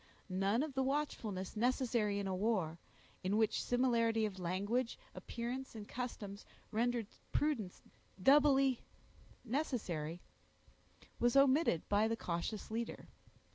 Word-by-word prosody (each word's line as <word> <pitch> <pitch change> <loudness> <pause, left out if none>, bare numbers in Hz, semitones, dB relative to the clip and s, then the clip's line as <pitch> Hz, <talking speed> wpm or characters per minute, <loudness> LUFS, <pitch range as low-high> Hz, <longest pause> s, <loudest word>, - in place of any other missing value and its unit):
None 195 +7 +2
of 305 -3 -4
the 265 - +1
watchfulness 250 -9 -2
necessary 235 -3 +1
in 200 - -2
a 190 - -1
war, 185 -5 0 0.4
in 195 +3 +1
which 220 -1 +2
similarity 230 -3 +2
of 195 -3 -4
language, 205 +8 -1 0.2
appearance, 245 +2 -5
and 210 -2 -7
customs 215 -5 -5 0.3
rendered 235 +1 +1 0.3
prudence 250 -12 -1 0.4
doubly 270 +2 +5 0.6
necessary, 200 - -2 1.0
was 240 +1 +3
omitted 275 - +4
by 205 +2 +3
the 225 0 -1
cautious 180 +5 -3
leader. 230 +1 -4
225 Hz, 115 wpm, -36 LUFS, 200-255 Hz, 1.0 s, doubly